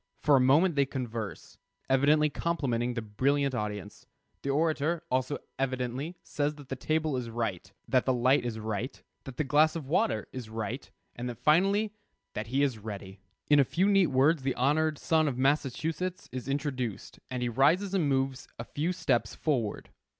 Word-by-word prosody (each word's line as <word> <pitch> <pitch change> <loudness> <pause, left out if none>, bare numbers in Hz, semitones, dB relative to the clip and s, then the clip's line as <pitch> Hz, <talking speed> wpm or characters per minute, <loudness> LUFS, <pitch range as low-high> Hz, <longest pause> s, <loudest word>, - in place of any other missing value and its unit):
For 150 -2 +6
a - - +6
moment 150 +8 +5
they 140 -2 +2
converse, 120 -6 -5 0.3
evidently 145 +3 +4
complimenting 125 -6 -1
the 115 - -2
brilliant 135 +6 +1
audience. 105 -4 -5 0.3
The 140 - -3
orator, 155 +2 +1
also, 130 +3 0 0.2
evidently 130 +4 -2
says 145 0 -1
that 145 -3 -13
the 135 - -2
table 155 +1 0
is 120 -2 -4
right, 110 -5 -3 0.2
that 130 -2 +2
the 130 - +3
light 125 +2 +3
is 120 -2 -3
right, 110 +3 -4 0.3
that 135 -2 -9
the - - +1
glass 155 +3 +4
of 160 -4 -4
water 115 - +1
is 125 -4 -6
right, 110 +4 -4 0.3
and 120 -1 -5
finally 195 - +3 0.4
that 110 +1 -4
he 135 +4 +1
is 130 -6 0
ready. 100 -2 -8 0.3
In 145 -1 +6
a - - +7
few 180 +9 +1
neat 195 -3 +5
words 140 +4 +3
"the 135 0 -1
honored 150 +4 +2
son 160 0 +2
of 130 -4 -2
Massachusetts" 150 +6 0
is 130 +1 -5
introduced, 135 -6 -3
and 125 -1 -3
he 120 - 0
rises 160 - +3
and 170 -7 +2
moves 135 -1 0
a 115 - -5
few 155 +9 -2
steps 130 -9 0
forward. 125 -9 -1
135 Hz, 175 wpm, -29 LUFS, 120-150 Hz, 0.4 s, a